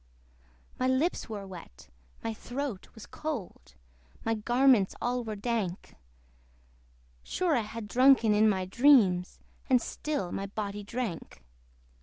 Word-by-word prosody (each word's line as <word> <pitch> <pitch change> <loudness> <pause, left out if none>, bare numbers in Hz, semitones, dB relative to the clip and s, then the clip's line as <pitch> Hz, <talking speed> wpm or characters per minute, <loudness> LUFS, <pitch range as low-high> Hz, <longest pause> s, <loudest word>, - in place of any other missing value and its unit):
My 255 - +1
lips 260 +5 0
were 205 -3 -5
wet, 175 - -12 0.4
my 225 - -2
throat 245 -2 -5
was 220 - -10
cold, 190 - -6 0.5
My 225 - +1
garments 240 -1 +3
all 245 0 -1
were 220 -2 -5
dank; 205 -4 -3 1.3
Sure 345 - 0
I - - +3
had 215 0 -7
drunken 250 -2 +5
in 215 +1 +5
my 190 -2 0
dreams, 195 -5 +4 0.3
And 255 -1 +5
still 260 -7 -4
my 195 - -3
body 205 0 -4
drank. 205 - -5
220 Hz, 125 wpm, -29 LUFS, 195-255 Hz, 1.3 s, drunken